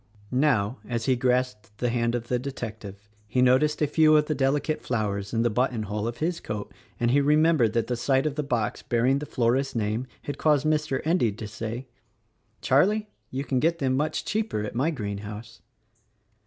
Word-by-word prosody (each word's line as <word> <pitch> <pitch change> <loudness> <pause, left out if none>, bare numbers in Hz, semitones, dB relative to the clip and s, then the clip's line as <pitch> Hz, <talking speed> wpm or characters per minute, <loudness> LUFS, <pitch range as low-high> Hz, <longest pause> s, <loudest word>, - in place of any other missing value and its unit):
Now, 125 -4 +1
as 115 -2 -2
he 130 - +3
grasped 125 -5 -1
the 125 - 0
hand 120 0 0
of 120 -1 -4
the 125 0 0
detective 110 -6 -7 0.2
he 120 +5 -1
noticed 130 +5 +3
a - - +5
few 155 +1 +5
of 150 - +3
the 155 - -1
delicate 145 +3 0
flowers 100 -4 -2
in 115 0 +1
the 120 - +3
button 125 0 0
hole 105 +1 -3
of 120 - -4
his 170 +2 -1
coat 105 -1 -6 0.3
and 120 0 +2
he 140 +2 +4
remembered 150 -5 +3
that 115 -1 +1
the 125 - -2
sight 135 +3 +1
of 155 - 0
the 150 - -2
box 120 -7 -1
bearing 125 +4 +1
the 150 - -6
florist's 130 +3 0
name 110 +3 -1 0.2
had 145 - -5
caused 150 -2 +3
Mr. 150 -3 +1
Endy 160 - +2
to 110 +1 -7
say: 115 +4 -5 0.8
"Charlie, 210 +10 +2 0.2
you 135 +2 -3
can 130 -1 0
get 165 +4 +2
them 130 -4 0
much 150 +3 -1
cheaper 215 - -1
at 105 - -5
my 130 +7 +1
greenhouse." 105 -3 -6
125 Hz, 195 wpm, -26 LUFS, 115-145 Hz, 0.8 s, a